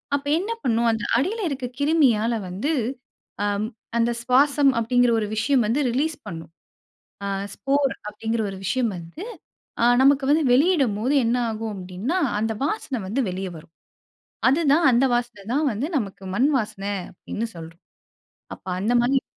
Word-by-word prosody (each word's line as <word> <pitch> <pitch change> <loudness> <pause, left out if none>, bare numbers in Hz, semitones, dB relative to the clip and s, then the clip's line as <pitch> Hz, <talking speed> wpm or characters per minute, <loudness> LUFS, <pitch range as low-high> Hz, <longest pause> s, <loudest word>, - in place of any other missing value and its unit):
அப்ப 285 0 -4
என்ன 415 +5 -3
பண்ணும் 235 0 +2
அந்த 225 - -2
அடியில 385 - 0
இருக்க 265 -2 -4
கிருமியால 260 -7 +3 0.2
வந்து, 210 - -2 0.7
ஆம் 205 +1 0 0.3
அந்த 235 +1 +2
சுவாசம் 275 +3 +4
அப்பிடிங்கிற 245 +1 +3
ஒரு 210 - -2
விஷயம் 245 +2 +2
வந்து 245 +7 +1
ரிலீஸ் 295 +5 0
பண்ணும். 165 -1 -8 0.7
ஆ - - -2 0.3
ஸ்போர் 275 0 +1
அப்பிடிங்கிற 225 +2 -2
ஒரு 190 - -7
விஷயம் 235 +2 0
வந்து 170 - -9 0.6
அ - - +5 0.2
நமக்கு 275 0 +4
வந்து 310 +2 +4
வெளியிடும் 275 - +3
போது 250 +6 0
என்ன 235 +2 +2
ஆகும் 220 0 -4
அப்பிடின்னா, 190 - -3 0.2
அந்த 225 0 0
வாசனை 290 - -2
வந்து 235 +8 -1
வெளிய 190 +1 -4
வரும். 165 +1 -14 0.8
அதுதான் 295 +2 +3
அந்த 245 +2 +3
வாசன 235 -5 -3
தான் 300 +1 +2
வந்து 235 +8 -2
நமக்கு 200 -5 -4
மண்வாசனை, 215 -6 0 0.2
அப்பிடின்னு 225 +5 -5
சொல்றோம். 165 +1 -11 0.7
அப்ப - - -27
அந்தமாரி 245 +5 +2
240 Hz, 145 wpm, -23 LUFS, 210-280 Hz, 0.8 s, அ